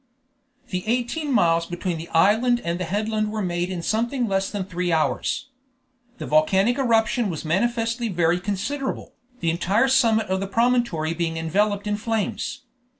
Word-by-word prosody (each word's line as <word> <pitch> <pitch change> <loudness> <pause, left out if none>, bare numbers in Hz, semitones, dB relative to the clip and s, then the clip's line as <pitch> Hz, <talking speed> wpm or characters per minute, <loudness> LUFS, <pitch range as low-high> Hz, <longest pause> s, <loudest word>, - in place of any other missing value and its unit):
The 185 -1 -3
eighteen 250 +6 -1
miles 170 -7 +3
between 175 -1 -3
the 165 - -7
island 220 +8 +3
and 170 +1 -1
the 180 - -2
headland 215 +3 -1
were 215 -1 -2
made 175 0 -1
in 180 -3 -4
something 235 +5 0
less 195 -1 0
than 200 -3 -3
three 180 -1 -2
hours. 165 - 0 0.7
The - - -6
volcanic 190 - +3
eruption 230 -2 +2
was 160 -2 -5
manifestly 230 +6 0
very 175 -1 +1
considerable, 210 +9 -3 0.3
the 165 - +1
entire 195 +9 +2
summit 230 -4 +3
of 190 -2 -1
the 195 - -3
promontory 230 -8 +1
being 165 -1 -2
enveloped 200 +6 0
in 210 0 -1
flames. 225 +5 -2
205 Hz, 155 wpm, -23 LUFS, 175-235 Hz, 0.7 s, miles